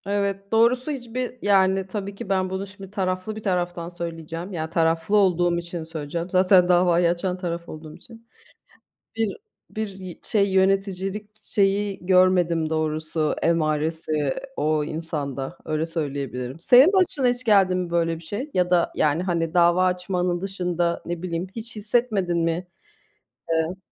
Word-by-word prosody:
Evet, 200 0 -2
doğrusu 245 +5 +3
hiçbir 250 -1 -4
Yani, 190 -1 +3
tabii 200 0 -5
ki 195 - -8
ben 190 -1 +1
bunu 190 +1 -4
şimdi 195 -1 -12
taraflı 185 +1 -2
bir 215 - -8
taraftan 175 -2 -1
söyleyeceğim. 170 +1 -6
Ya, 160 -2 -3
taraflı 165 +3 +1
olduğum 175 -3 +3
için 170 -1 -5
söyleyeceğim. 165 +2 -5
Zaten 185 -1 +4
davayı 175 -1 +4
açan 180 +1 -1
taraf 170 -2 -5
olduğum 155 0 -9
için. 230 -1 -16 0.9
Bir 225 -3 -1 0.4
bir 220 0 -3
y 190 -3 -9
şey, 200 -2 +1
yöneticilik 195 +1 0
şeyi 200 -2 0
görmedim 180 -3 +3
doğrusu, 155 0 -1
emaresi 155 -2 0 0.2
o 155 0 +1
insanda. 145 -4 -4
Öyle 155 +1 -1
söyleyebilirim. 140 -4 -4
Senin 255 - +7
başına 345 -9 +2
hiç 245 +1 -1
geldi 195 -5 +4
mi 180 -1 -2
böyle 165 -1 +1
bir 165 - -12
şey? 225 - -5
Ya 180 -1 +2
da, 175 -2 +2
yani, 155 +3 +1
hani 170 -2 -1
dava 175 +1 +4
açmanın 180 -1 -1
dışında. 180 -3 -1
Ne 175 0 -4
bileyim, 175 0 -3
hiç 230 +1 -7
hissetmedin 210 -5 0
mi? 165 +2 -1 0.8
Evet. 165 +2 0
180 Hz, 145 wpm, -24 LUFS, 165-195 Hz, 0.9 s, Senin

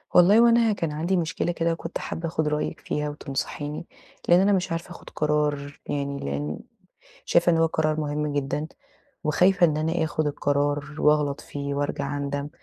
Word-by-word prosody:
والله 190 +5 +7
هو 235 - +7
أنا 230 -2 +4
كان 165 -5 -2
عندي 165 +5 0
مشكلة 165 0 -1
كده 170 0 0
وكنت 165 +1 -5
حابّة 165 - -4
آخد 160 -1 -1
رأيِك 150 0 -2
فيها، 150 0 -2
وتنصحيني 145 +2 -4 0.4
لأن 175 +1 +7
أنا 195 +2 +4
مش 185 -2 0
عارفة 165 +1 -4
آخد 175 - -11
قرار 150 -1 -1
يعني 140 -1 -2
لأن 70 +2 -3 0.7
شايفة 170 0 +3
إن - - +3
هو 165 0 +4
قرار 155 -1 0
مهم 150 0 -2
جدًا، 145 +1 -1 0.6
وخايفة 180 +4 +4
إن 155 -2 0
أنا 160 +2 0
آخد 155 0 -1
القرار 145 0 0
وأغلط 150 -2 +2
فيه 140 0 -5
وأرجع 145 0 -2
أندم 140 0 -3
150 Hz, 170 wpm, -25 LUFS, 145-170 Hz, 0.7 s, والله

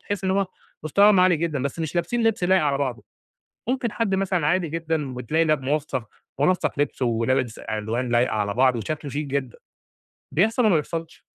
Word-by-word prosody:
تحس 200 -2 -4
إن 190 - +1
هُم 195 0 +1 0.4
مستواهم 200 +5 +5
عالي 180 -2 +5
جدًا 155 -5 -2
بس 140 +3 -3
مش 160 -1 -3
لابسين 230 +8 0
لِبس 225 -4 +1
لايق 185 -1 +4
على 140 -2 +1
بعضه، 125 -6 -2 0.7
ممكن 255 -3 0
حد 205 -4 0
مثلًا 185 -5 0
عادي 175 0 +1
جدًا 160 -4 -2
وتلاقي 150 +7 0
لأ 155 -1 +3
مُنسّق، 135 -3 -2 0.4
مُنسّق 150 -3 +1
لِبسه 140 -3 0
ولابس 120 +1 0
ألوان 110 +4 -3
لايقة 120 +1 +2
على 100 -1 -1
بعض 130 0 +3
وشكله 145 +5 -4
شيك 150 +1 -3
جدًا، 135 -3 -3 0.8
بيحصل 220 - +2
والّا 215 - +5
ما - - +5
بيحصلش؟ 165 +1 -7
150 Hz, 185 wpm, -24 LUFS, 130-185 Hz, 0.8 s, مستواهم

